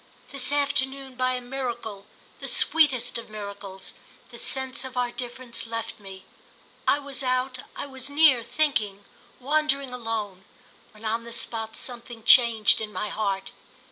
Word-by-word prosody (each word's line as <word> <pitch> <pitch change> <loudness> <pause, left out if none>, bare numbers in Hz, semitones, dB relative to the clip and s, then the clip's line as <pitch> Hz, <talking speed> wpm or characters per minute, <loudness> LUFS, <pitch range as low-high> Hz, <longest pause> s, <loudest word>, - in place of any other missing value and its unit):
This 275 -1 +3
afternoon, 275 -2 0
by 255 0 +1
a 250 - -2
miracle, 240 -5 -5 0.3
the - - -6
sweetest 265 -8 +4
of 230 - -11
miracles, 200 -2 -8 0.4
the - - -5
sense 265 -1 0
of 260 -1 -8
our 245 -1 +1
difference 240 -1 -6
left 230 -1 -5
me. 190 -2 -10 0.6
I - - +5
was 280 -3 -3
out—I 255 0 -2
was 265 -1 -5
near, 285 -4 +6
thinking, 215 -8 -1 0.3
wandering 280 -1 +1
alone, 220 -6 -3 0.5
when, 215 0 -14
on 225 +1 0
the 235 - -9
spot, 225 -1 -2
something 240 -2 -5
changed 230 -3 +6
in 215 -1 -4
my 210 - -3
heart. 195 -2 -2
245 Hz, 140 wpm, -26 LUFS, 220-265 Hz, 0.6 s, near